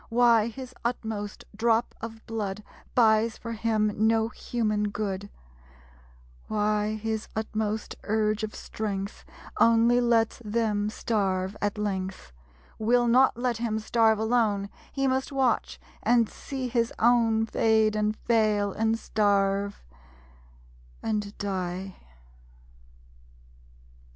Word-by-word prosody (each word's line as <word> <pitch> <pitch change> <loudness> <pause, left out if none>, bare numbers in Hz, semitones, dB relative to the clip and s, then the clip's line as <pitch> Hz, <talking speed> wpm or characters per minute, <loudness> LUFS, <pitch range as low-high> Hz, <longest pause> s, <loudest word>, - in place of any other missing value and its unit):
Why 230 -2 +4
his 255 +2 -8
utmost 220 -4 -4
drop 230 +1 +1
of 225 0 -8
blood 210 -2 -4 0.3
Buys 225 -1 +4
for 230 - -7
him 220 -1 +1 0.2
no 225 0 +2
human 215 -4 -1
good; 200 -1 -4 1.2
Why 210 0 0
his 220 0 -3
utmost 215 0 -2
urge 215 0 +1
of 215 -1 -4
strength 200 -2 -5 0.4
Only 230 +1 +5
lets 230 -2 +2
Them 210 -1 0
starve 195 -3 -1
at 205 0 -1
length; 190 - -3 0.5
Will 240 +2 +3
not 255 +1 +4
let 245 -1 0
him 225 -2 -1
starve 220 0 +3
alone; 220 -3 +1 0.2
He 275 -1 -1
must 265 +1 0
watch, 265 -4 0 0.2
and 235 0 +3
see 265 +2 -5
his 235 -1 0
own 225 -1 +3
Fade 220 -1 +2
and 210 0 0
fail, 215 -3 +1
and 225 0 +1
starve, 200 -2 0 1.2
and 210 -2 -2
die. 190 -1 -3
220 Hz, 110 wpm, -27 LUFS, 210-230 Hz, 1.2 s, Only